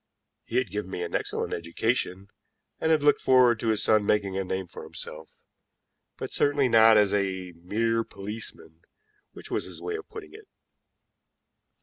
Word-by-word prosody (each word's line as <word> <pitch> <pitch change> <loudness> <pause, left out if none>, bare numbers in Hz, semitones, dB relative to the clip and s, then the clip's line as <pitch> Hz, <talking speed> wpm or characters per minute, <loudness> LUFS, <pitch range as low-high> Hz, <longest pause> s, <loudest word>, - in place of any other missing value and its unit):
He 115 - -7
had 125 -8 0
given 105 -2 -4
me 90 - -4
an 85 - -6
excellent - - -2
education, 95 +2 -2 0.5
and 160 - 0
had 155 -2 +3
looked 145 - +4
forward 125 -3 +5
to 115 - -3
his 110 -2 +1
son 110 -1 +4
making 100 -2 +1
a 95 - -1
name 95 0 -3
for 85 - -10
himself, 80 +1 -8 0.9
but - - -6
certainly 145 -2 +2
not 115 -2 +7
as 105 -2 +4
a 95 -2 -1
mere 115 +7 -1
policeman, 100 -6 -7 0.5
which - - -11
was - - 0
his - - -7
way 435 - -4
of 430 - -8
putting 430 -3 -10
it. 430 -1 -13
105 Hz, 165 wpm, -27 LUFS, 95-120 Hz, 0.9 s, not